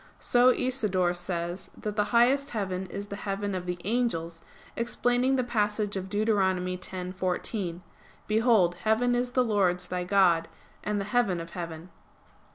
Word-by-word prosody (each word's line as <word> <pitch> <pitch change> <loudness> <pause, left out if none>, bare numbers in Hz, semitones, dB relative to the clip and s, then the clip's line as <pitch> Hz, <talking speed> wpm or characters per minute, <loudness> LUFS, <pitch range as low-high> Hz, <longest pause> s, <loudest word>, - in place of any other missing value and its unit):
So 245 +1 +4
Isidore 210 -9 +1
says 175 0 -4
that 210 -1 -4
the 210 -1 +2
highest 255 +5 +3
heaven 190 -4 -3
is 200 +3 -6
the 200 - -4
heaven 200 0 -3
of 180 -1 -4
the 180 0 -2
angels, 170 -8 -1 0.3
explaining 245 +2 +1
the 255 - +1
passage 210 -3 -1
of 190 0 -4
Deut. 210 +2 0
10:14: 185 -1 -1 0.4
"Behold 215 -5 +3
heaven 225 +3 +2
is 245 0 0
the 255 - +3
Lord's 190 -6 +1
thy 180 0 -2
God, 180 -3 +3 0.4
and 210 0 -1
the 200 - -3
heaven 210 -5 +1
of 165 0 -7
heaven." 170 0 -7
200 Hz, 150 wpm, -28 LUFS, 180-230 Hz, 0.4 s, So